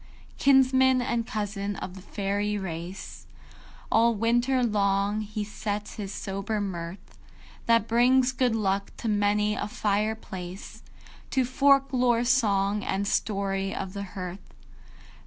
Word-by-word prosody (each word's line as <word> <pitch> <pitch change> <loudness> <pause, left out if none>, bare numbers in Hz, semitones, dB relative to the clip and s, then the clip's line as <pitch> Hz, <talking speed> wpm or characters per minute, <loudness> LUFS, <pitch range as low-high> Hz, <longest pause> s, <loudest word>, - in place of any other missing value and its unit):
IV. - - -26
Kinsman 260 -1 +5
and 235 -2 -1
cousin 205 -1 -3
of 185 -1 -6
the 190 - -10
Faëry 205 +1 -2
Race, 175 0 -7 0.6
All 230 +1 +4
winter 240 +4 +2
long 200 -1 +1
he 215 0 -4
sets 205 0 -4
his 200 -3 -5
sober 200 +2 -3
mirth, 185 -1 -6 0.5
That 230 -2 +4
brings 250 +3 +4
good 250 -3 +1
luck 200 -2 0
to - - -4
many 210 0 +2
a - - -3
fire 210 +1 0
place, 185 -3 -9 0.5
To 260 -1 +1
folk 275 +2 +4
lore 245 -2 +3
song 210 -5 +2
and 200 +1 -1
story 195 -2 -1
of 190 -1 -5
the 200 - -5 0.2
hearth. 185 +1 -7
210 Hz, 135 wpm, -27 LUFS, 195-235 Hz, 0.6 s, Kinsman